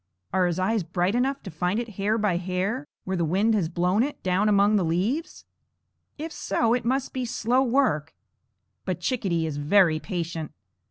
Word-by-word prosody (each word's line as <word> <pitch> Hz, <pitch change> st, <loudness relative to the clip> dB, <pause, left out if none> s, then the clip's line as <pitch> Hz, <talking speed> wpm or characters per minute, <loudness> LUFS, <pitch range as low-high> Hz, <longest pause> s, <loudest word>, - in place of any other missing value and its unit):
Are 185 Hz, -1 st, +3 dB
his 175 Hz, -1 st, -1 dB
eyes 195 Hz, +4 st, +1 dB
bright 175 Hz, +3 st, -1 dB
enough 270 Hz, +3 st, 0 dB
to 190 Hz, -, -7 dB
find 180 Hz, +6 st, -1 dB
it 240 Hz, -1 st, -4 dB
hair 205 Hz, +2 st, 0 dB
by 210 Hz, -5 st, +1 dB
hair 190 Hz, +10 st, -2 dB, 0.2 s
where 190 Hz, -, -2 dB
the 175 Hz, -, 0 dB
wind 195 Hz, +8 st, +2 dB
has 190 Hz, -7 st, +1 dB
blown 180 Hz, +4 st, +1 dB
it, 285 Hz, +4 st, -3 dB
down 190 Hz, +3 st, +2 dB
among 205 Hz, +1 st, +4 dB
the 200 Hz, -, +3 dB
leaves? 195 Hz, -, -1 dB, 0.7 s
If 315 Hz, +2 st, -5 dB
so, 230 Hz, -6 st, 0 dB
it 245 Hz, -, 0 dB
must 260 Hz, +3 st, -1 dB
be 260 Hz, -, -2 dB
slow 245 Hz, +1 st, +1 dB
work; 235 Hz, -, +1 dB, 0.7 s
but -, -, -3 dB
Chickadee 190 Hz, -10 st, 0 dB
is 155 Hz, -2 st, -3 dB
very 160 Hz, +2 st, +4 dB
patient. 170 Hz, -5 st, -4 dB
195 Hz, 180 wpm, -25 LUFS, 175-235 Hz, 0.7 s, among